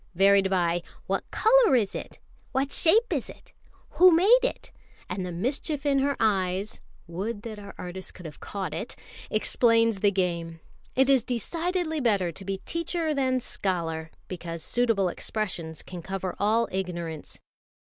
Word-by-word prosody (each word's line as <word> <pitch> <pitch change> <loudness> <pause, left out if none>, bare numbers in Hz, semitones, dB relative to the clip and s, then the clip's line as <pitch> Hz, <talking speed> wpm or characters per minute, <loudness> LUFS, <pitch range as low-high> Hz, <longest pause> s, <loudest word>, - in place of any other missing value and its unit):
varied 195 +1 +5
by 175 -2 +1 0.2
"What - - -2
colour 460 - +5
is 210 -6 +1
it? - - -7 0.4
What 270 +1 0
shape 445 +9 +4
is - - -2
it? - - -14 0.5
Who 365 0 +10
made 390 +9 +6
it?" - - -3 0.4
and 185 +1 -3
the 180 - -4
mischief 275 - -2
in 280 -1 +3
her 280 +1 +1
eyes 195 -2 0 0.2
(would 205 +6 -4
that 220 -2 -7
our 200 - -10
artist 180 +1 -7
could 180 - -12
have 150 -2 -9
caught 195 -2 -5
it!) - - -5 0.3
explains 230 0 +3
the 205 - +4
game. 170 -4 -2 0.4
It 265 0 +4
is 270 -4 +4
decidedly 320 - -2
better 200 -9 +2
to 195 - -10
be 195 0 -3
teacher 335 -1 -1
than 260 -2 +1
scholar, 165 -7 -2 0.2
because 170 -2 -6
suitable 225 -7 +1 0.2
questions 175 -7 -3
can 180 -2 -8
cover 190 +1 -4
all 220 +3 +2
ignorance. 170 -4 -4
205 Hz, 155 wpm, -27 LUFS, 180-270 Hz, 0.5 s, Who